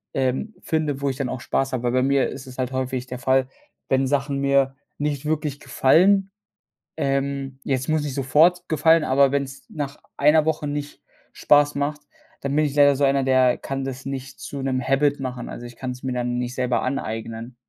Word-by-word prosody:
ähm, 135 Hz, -, -1 dB
finde, 155 Hz, -4 st, -1 dB
wo 140 Hz, -, +1 dB
ich 130 Hz, -, -4 dB
dann 130 Hz, -2 st, -2 dB
auch 130 Hz, -, -4 dB
Spaß 135 Hz, +2 st, -1 dB
habe. 125 Hz, -1 st, -3 dB
Weil 120 Hz, -, +1 dB
bei 130 Hz, +1 st, +2 dB
mir 135 Hz, 0 st, +2 dB
ist 130 Hz, -1 st, -9 dB
es 130 Hz, -, -11 dB
halt 130 Hz, 0 st, -2 dB
häufig 130 Hz, -1 st, -2 dB
der 125 Hz, -1 st, -7 dB
Fall, 130 Hz, -1 st, +2 dB, 0.4 s
wenn 135 Hz, 0 st, +2 dB
Sachen 140 Hz, 0 st, 0 dB
mir 140 Hz, -1 st, +2 dB, 0.2 s
nicht 145 Hz, -1 st, -2 dB
wirklich 150 Hz, -2 st, -2 dB
gefallen, 190 Hz, +9 st, +3 dB, 0.6 s
ähm, 135 Hz, -1 st, -2 dB
jetzt 130 Hz, +1 st, -1 dB
muss 155 Hz, -1 st, +1 dB
nicht 145 Hz, -2 st, -3 dB
sofort 160 Hz, +7 st, +3 dB
gefallen, 160 Hz, +1 st, +4 dB
aber 140 Hz, -1 st, +4 dB
wenn's 135 Hz, -1 st, -3 dB
nach 145 Hz, -2 st, -5 dB, 0.2 s
einer 150 Hz, +2 st, +4 dB
Woche 155 Hz, -2 st, -1 dB
nicht 145 Hz, 0 st, -5 dB, 0.3 s
Spaß 145 Hz, 0 st, +4 dB
macht, 145 Hz, +1 st, -2 dB, 0.4 s
dann 140 Hz, +1 st, -2 dB
bin 155 Hz, -, +3 dB
ich 145 Hz, -1 st, -3 dB
leider 145 Hz, -1 st, +6 dB
so 145 Hz, -, -1 dB
einer, 135 Hz, 0 st, +3 dB
der 130 Hz, -1 st, +3 dB
kann 135 Hz, 0 st, -4 dB
das 135 Hz, 0 st, -6 dB
nicht 135 Hz, 0 st, -6 dB
zu 140 Hz, -1 st, -6 dB
'nem 130 Hz, -1 st, 0 dB
habit 140 Hz, +1 st, +2 dB
machen. 125 Hz, -2 st, -5 dB
Also, 120 Hz, -, -8 dB
ich 120 Hz, 0 st, -10 dB
kann's 125 Hz, 0 st, -6 dB
mir 130 Hz, -1 st, -2 dB
dann 120 Hz, 0 st, -1 dB
nicht 125 Hz, 0 st, -3 dB
selber 125 Hz, -2 st, 0 dB
aneignen. 115 Hz, -2 st, -4 dB
135 Hz, 200 wpm, -23 LUFS, 130-145 Hz, 0.6 s, leider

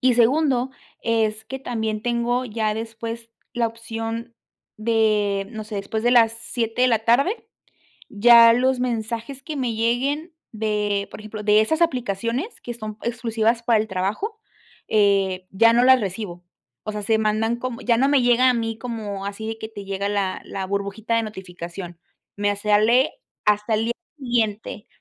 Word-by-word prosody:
y 255 Hz, -1 st, +4 dB
segundo, 260 Hz, +1 st, +3 dB, 0.3 s
es 220 Hz, -1 st, 0 dB
que 265 Hz, +4 st, -6 dB
también 220 Hz, -4 st, -2 dB
tengo 240 Hz, +1 st, 0 dB
ya 215 Hz, -2 st, -1 dB
después 230 Hz, +1 st, -6 dB, 0.2 s
la 240 Hz, -2 st, +1 dB
opción 230 Hz, +1 st, -6 dB, 0.4 s
de, 215 Hz, -3 st, +1 dB
no 220 Hz, -2 st, -6 dB
sé, 215 Hz, 0 st, -6 dB
después 200 Hz, +2 st, -3 dB
de 240 Hz, -, +3 dB
las 230 Hz, -2 st, +5 dB
7 230 Hz, +1 st, -2 dB
de 255 Hz, -, +5 dB
la 225 Hz, -3 st, +2 dB
tarde 275 Hz, -, +2 dB, 0.7 s
ya 230 Hz, +2 st, +8 dB
los 255 Hz, +2 st, +2 dB
mensajes 235 Hz, +2 st, -3 dB
que 305 Hz, -1 st, -6 dB
me 250 Hz, -4 st, -1 dB
lleguen 270 Hz, +9 st, 0 dB, 0.2 s
de 210 Hz, -2 st, -1 dB
por -, -, -9 dB
ejemplo, 215 Hz, 0 st, -7 dB
de 210 Hz, +1 st, +5 dB
esas 315 Hz, +9 st, 0 dB
aplicaciones 250 Hz, -, -1 dB
que 240 Hz, -, -6 dB
son 215 Hz, -2 st, -7 dB
exclusivas 230 Hz, -1 st, 0 dB
para 230 Hz, -2 st, +3 dB
el 220 Hz, -, -3 dB
trabajo, 210 Hz, -, -2 dB, 0.5 s
eh, 195 Hz, -3 st, +2 dB
ya 230 Hz, +4 st, +5 dB
no 240 Hz, -, +4 dB
las 260 Hz, 0 st, +7 dB
recibo, 190 Hz, -3 st, -5 dB, 0.4 s
o 215 Hz, -, -3 dB
sea, 210 Hz, -, -4 dB
se 220 Hz, +2 st, +2 dB
mandan 220 Hz, +2 st, +1 dB
como 250 Hz, 0 st, -5 dB
ya 235 Hz, -1 st, +2 dB
no 265 Hz, +4 st, +3 dB
me 285 Hz, -, +4 dB
llega 245 Hz, +1 st, +5 dB
a 250 Hz, -, +2 dB
mí 225 Hz, -1 st, -2 dB
como, 220 Hz, -4 st, -5 dB
así 200 Hz, +2 st, -5 dB
de 225 Hz, -, -4 dB
que 220 Hz, -, -6 dB
te 205 Hz, -2 st, -8 dB
llega 200 Hz, +1 st, -2 dB
la 200 Hz, -2 st, -1 dB
la 190 Hz, -1 st, -5 dB
burbujita 200 Hz, +3 st, -2 dB
de 230 Hz, -, +2 dB
notificación, 180 Hz, -4 st, -8 dB, 0.4 s
me 205 Hz, 0 st, +1 dB
sale 215 Hz, +6 st, +3 dB, 0.3 s
hasta 210 Hz, +1 st, +2 dB
el 220 Hz, +1 st, +1 dB
día 235 Hz, -, -1 dB, 0.2 s
siguiente. 225 Hz, -5 st, -2 dB
225 Hz, 170 wpm, -23 LUFS, 210-240 Hz, 0.7 s, ya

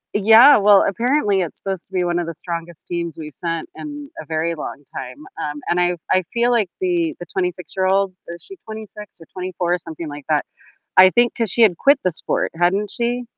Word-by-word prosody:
Yeah, 225 Hz, +7 st, +8 dB
well, 205 Hz, -1 st, +6 dB
apparently 230 Hz, -2 st, +1 dB
it's 170 Hz, -, -5 dB
supposed 190 Hz, -2 st, -5 dB
to -, -, -41 dB
be 180 Hz, -1 st, 0 dB
one 175 Hz, 0 st, 0 dB
of 170 Hz, -, -3 dB
the 165 Hz, -, -5 dB
strongest 170 Hz, -1 st, -7 dB
teams 170 Hz, -3 st, -4 dB
we've 150 Hz, -2 st, -8 dB
sent 165 Hz, -, -2 dB
in 290 Hz, -2 st, -8 dB
a -, -, -12 dB
very 165 Hz, +1 st, -1 dB
long 145 Hz, -2 st, -7 dB
time. 125 Hz, +1 st, -6 dB, 0.3 s
Um, 150 Hz, 0 st, -4 dB
and 175 Hz, +1 st, +2 dB
I 175 Hz, 0 st, +1 dB
I 185 Hz, -, +3 dB
feel 240 Hz, +1 st, +1 dB
like 215 Hz, -6 st, +2 dB
the 350 Hz, -3 st, 0 dB
the 175 Hz, -, -7 dB
twenty-six-year-old 185 Hz, +1 st, 0 dB
is 170 Hz, 0 st, -8 dB
she 390 Hz, -, -10 dB
26 215 Hz, -1 st, -10 dB
or 165 Hz, -, -13 dB
24? 180 Hz, -1 st, -2 dB
Something 165 Hz, 0 st, -8 dB
like 145 Hz, -1 st, -9 dB
that, 150 Hz, -1 st, +1 dB, 0.5 s
I 185 Hz, 0 st, +9 dB
think 240 Hz, +2 st, +3 dB
'cause 230 Hz, -5 st, -1 dB
she 235 Hz, -, -2 dB
had 200 Hz, -7 st, +5 dB
quit 280 Hz, +1 st, +4 dB
the 185 Hz, -, +3 dB
sport, 160 Hz, -, -2 dB
hadn't 195 Hz, +4 st, +1 dB
she? 240 Hz, +1 st, -2 dB
185 Hz, 205 wpm, -20 LUFS, 170-225 Hz, 0.5 s, I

